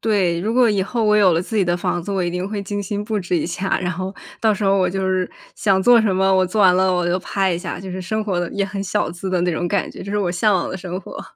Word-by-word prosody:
对。 190 -6 +1
如 215 +5 -1
果 250 -2 +5
以 200 -3 +1
后 230 +3 -1
我 210 0 +4
有 190 -4 +5
了 165 - +2
自 205 +4 -5
己 200 - +3
的 175 0 +1
房 175 0 -2
子， 200 - -6
我 190 -2 0
一 175 - -1
定 180 +2 -3
会 205 -1 -4
精 205 +1 -4
心 205 +1 -3
布 215 -1 -1
置 180 -1 -1
一 160 - -1
下， 185 +3 -1
然 180 -1 -2
后 185 +3 -5 0.3
到 220 -1 +3
时 205 0 -2
候 195 0 +3
我 185 - +2
就 190 +1 -2
是 185 -1 0 0.2
想 190 -2 +2
做 245 +1 +6
什 205 -4 +1
么 190 +1 +3
我 185 0 +4
做 210 +4 -1
完 185 -2 +6
了 185 0 +3
我 180 -1 0
就 175 +1 +1
拍 190 0 -1
一 170 - -1
下， - - -5
就 190 - -7
是 185 +1 -5
生 215 +4 -2
活 190 -4 -1
得 175 - -3
也 200 - 0
很 195 0 -4
小 205 -3 -1
资 180 +2 -5
的 180 - +1
那 180 - +1
种 175 +2 -2
感 200 -3 -1
觉， - - -9
这 200 - -7
是 210 - 0
我 180 -3 0
向 200 +3 +2
往 175 - 0
的 - - -4
生 180 0 -5
活。 - - -9
190 Hz, 350 characters per minute, -20 LUFS, 180-205 Hz, 0.3 s, 做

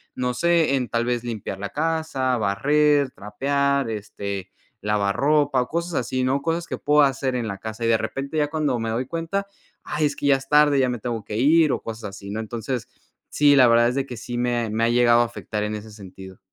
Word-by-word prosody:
no 125 0 -1
sé, 165 0 +2
en 130 -2 -1
tal 115 0 0
vez 120 -1 -1
limpiar 110 -5 -5
la 100 0 -4
casa, 160 -5 -1
barrer, 145 +7 +2
trapear, 140 +5 -1
este, 100 -3 -5 0.3
lavar 105 -1 0
ropa 145 -2 +2
o - - -11
cosas 170 +1 -3
así, 130 +1 -1
¿no?, 135 +2 +1
cosas 165 +1 -1
que - - -4
puedo 150 +1 +3
hacer 135 -2 +1
en 120 -2 -2
la 100 - -5
casa, 110 +3 -7
y - - +2
de 115 - +4
repente 140 +6 -4
ya 150 -1 +2
cuando 150 -5 -1
me 115 0 -2
doy 115 +3 -1
cuenta, 170 +6 -3 0.4
ay, 155 0 -1
es 145 -1 -1
que 145 - -2
ya 140 -1 +5
es 135 0 -12
tarde, 150 -1 +5
ya 130 - +3
me 120 -1 -3
tengo 115 -2 -4
que 105 - -6
ir 155 +4 +4
o - - -3
cosas 115 -1 -7
así, 100 0 -10
¿no?, 110 - -3
entonces, 115 +2 -4 0.4
sí, 145 -1 +4
la 130 -2 +7
verdad 120 0 +4
es 125 - -3
de 135 -1 0
que 125 - -8
sí 120 +2 -6
me 120 0 0
ha - - -6
me 110 +2 0
ha - - +2
llegado 120 0 +4
a - - +3
afectar 110 -2 -5
en 105 0 -2
ese 105 +1 -8
sentido. 95 -2 -12
125 Hz, 235 wpm, -23 LUFS, 110-145 Hz, 0.4 s, la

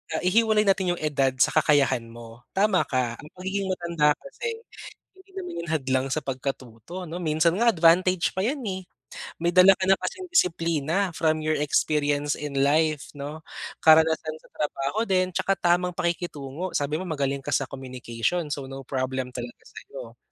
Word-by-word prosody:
ah, - - -2
ihiwalay 215 +3 +3
natin 190 -3 +2
yung 170 - -9
edad 140 -4 +1
sa 130 - +3
kakayahan 135 -5 +2
mo. 115 +1 -13
Tama 195 -1 +3
ka, 125 -3 -1
ang 150 - -11
pagiging 190 +2 -3
matanda 170 -5 +1
kasi, 455 - -6 0.6
hindi 380 +1 -20
naman 375 -2 -6
yun - - -10
hadlang 130 -3 0
sa 155 - 0
pagkatuto, 135 - -6
ano? 165 - -6
Minsan 165 0 +1
nga 235 +2 +4
advantage 175 +1 +3
pa 190 - 0
yan, 275 +6 -1
eh. 190 -1 -4 0.5
May 170 +1 0
dala 185 +1 +7
ka 190 - -1
na 190 - +6
kasing 370 0 -4
disiplina 170 - +1
from 160 -1 +1
your 155 - +2
experience 145 0 +1
in 145 -2 -4
life, 155 0 +2
'no? 145 +2 -6 0.4
Karanasan 160 0 +4
sa - - -20
trabaho 150 +8 -2
din, 185 -1 +1
tsaka 195 +2 +1
tamang 180 0 +1
pakikitungo, 170 -1 -3
sabi 145 +1 0
mo 185 - -5
magaling 140 -4 -1
ka 145 - -2
sa - - +2
communication. 130 +4 -3
So, 140 -2 -3
no 135 0 -7
problem 130 -1 -3
talaga 120 -1 -7
sa'yo. - - -11
160 Hz, 170 wpm, -25 LUFS, 140-185 Hz, 0.6 s, dala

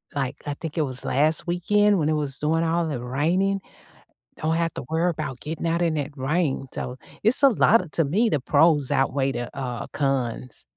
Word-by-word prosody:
like, 135 0 -2
I 145 - -2
think 160 +2 -7
it - - +3
was 130 -1 -4
last 155 +6 +2
weekend 205 +3 +2
when 150 0 +1
it - - +2
was 145 -3 -3
doing 160 +2 +1
all 165 0 +1
the 125 -5 -4
raining? 180 +10 0 0.8
Don't 160 +1 0
have 165 0 0
to - - -5
worry 170 +2 +1
'bout 135 -6 -5
getting 160 +2 -4
out 170 +1 0
in 165 -2 +1
that 145 0 -4
rain, 135 0 -1
so, 125 +1 -5 0.3
it's 240 +6 +3
a 275 - +9
lotta 220 -5 +3
to 165 - +2
me, 215 +10 +2
the 150 - +1
pros 145 +1 +3
outweigh 135 0 +1
the, 120 - -5
uh, 125 -3 -4
cons. 130 -4 -2
155 Hz, 200 wpm, -24 LUFS, 135-170 Hz, 0.8 s, a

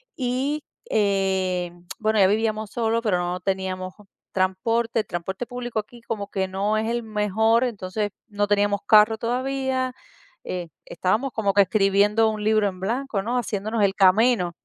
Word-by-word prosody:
y, 270 +4 -1 0.3
eh, 190 -3 +1 0.3
bueno, 215 -1 +1
ya 190 - +6
vivíamos 215 0 0
solos, 230 0 0
pero 195 -5 +2
no 175 +1 -2
teníamos 185 -1 -3 0.4
transporte, 225 +5 0
el - - -14
transporte 190 +7 -4
público 245 -3 -4
aquí 235 +3 -9
como 210 -3 -5
que 190 -1 -1
no 200 +3 0
es 220 +1 -1
el 240 0 -1
mejor, 220 +2 +2
entonces 205 -2 -3 0.2
no 205 -1 -1
teníamos 205 -1 +2
carro 215 +1 +6
todavía, 260 +2 -1 0.5
eh, 180 -2 -4 0.2
estábamos 215 +10 -1
como 200 -3 0
que 200 - +7
escribiendo 205 +3 +3
un 215 -1 -4
libro 215 -1 +3
en 185 -1 -5
blanco, 225 0 -2
¿no?, 245 +3 -1
haciéndonos 215 0 -2
el 195 0 +2
camino. 195 -1 +4
210 Hz, 155 wpm, -24 LUFS, 190-230 Hz, 0.5 s, que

